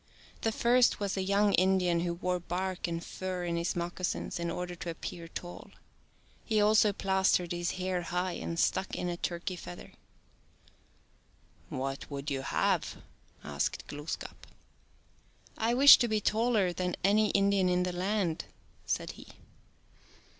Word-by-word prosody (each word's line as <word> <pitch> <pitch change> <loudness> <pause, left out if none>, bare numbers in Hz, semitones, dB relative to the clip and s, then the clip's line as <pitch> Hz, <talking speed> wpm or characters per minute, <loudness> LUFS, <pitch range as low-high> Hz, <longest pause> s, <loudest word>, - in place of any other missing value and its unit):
The 225 - +1
first 240 +2 +3
was 200 -2 -2
a 190 - -1
young 200 +2 +2
Indian 185 -2 +3
who 170 0 -1
wore 180 +1 -1
bark 180 +1 -3
and 170 0 -4
fur 185 -1 -4
in 170 -1 -1
his 170 +1 -1
moccasins 175 +1 -3
in 170 0 -2
order 180 +1 -4
to 170 - -5
appear 165 0 -6
tall. 175 +1 -8 0.7
He 220 -2 +1
also 210 0 +5
plastered 190 -3 +1
his 175 0 -1
hair 185 -1 -2
high 180 +2 -2
and 170 -1 -4
stuck 190 - +1
in 180 - -2
it - - -1
a - - -6
turkey 175 +1 -3
feather. 90 - -10 1.1
" - - -34
What 135 +1 -4
would 140 +1 -5
you 135 -1 -1
have? 135 - 0 0.2
" - - -31
asked 70 -1 -2
Glooskap. 145 +2 -7 0.6
" - - -35 0.3
I 230 +2 +1
wish 280 +3 +10
to 240 - +2
be 215 -1 +1
taller 215 -3 +1
than 180 0 -2
any 210 +2 +4
Indian 200 -2 +3
in 180 0 +2
the 180 0 -2
land," 180 -3 -1 0.4
said - - -1
he. - - -13
180 Hz, 160 wpm, -30 LUFS, 170-200 Hz, 1.1 s, wish